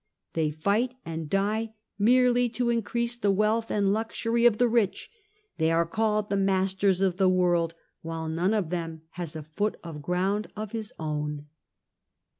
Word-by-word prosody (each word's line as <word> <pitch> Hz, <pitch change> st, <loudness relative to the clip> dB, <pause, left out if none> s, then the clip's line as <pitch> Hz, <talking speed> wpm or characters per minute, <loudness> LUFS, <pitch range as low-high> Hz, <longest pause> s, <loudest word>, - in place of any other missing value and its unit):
They 160 Hz, -2 st, +1 dB
fight 200 Hz, +11 st, 0 dB
and 160 Hz, -2 st, -5 dB
die 215 Hz, +4 st, 0 dB, 0.2 s
merely 245 Hz, +2 st, +4 dB
to 245 Hz, -1 st, +2 dB
increase 235 Hz, +1 st, -1 dB
the 210 Hz, -4 st, 0 dB
wealth 215 Hz, +3 st, +2 dB
and 200 Hz, -1 st, +2 dB
luxury 230 Hz, +2 st, +1 dB
of 220 Hz, -3 st, +2 dB
the 245 Hz, -, +4 dB
rich; 230 Hz, -, 0 dB, 0.5 s
they 160 Hz, +1 st, +3 dB
are 165 Hz, +1 st, +3 dB
called 210 Hz, +3 st, 0 dB
the 200 Hz, -, +2 dB
masters 190 Hz, 0 st, +2 dB
of 185 Hz, -2 st, +1 dB
the 190 Hz, -1 st, +4 dB
world 175 Hz, -2 st, +2 dB, 0.3 s
while 165 Hz, 0 st, -4 dB
none 175 Hz, +6 st, +1 dB
of 185 Hz, -6 st, -1 dB
them 165 Hz, -2 st, -4 dB
has 170 Hz, -3 st, -6 dB
a 155 Hz, -, -5 dB
foot 205 Hz, +8 st, -2 dB
of 160 Hz, -3 st, -7 dB
ground 190 Hz, +6 st, 0 dB
of 215 Hz, -1 st, -5 dB
his 220 Hz, -2 st, -4 dB
own." 150 Hz, -2 st, -3 dB
195 Hz, 165 wpm, -27 LUFS, 165-220 Hz, 0.5 s, merely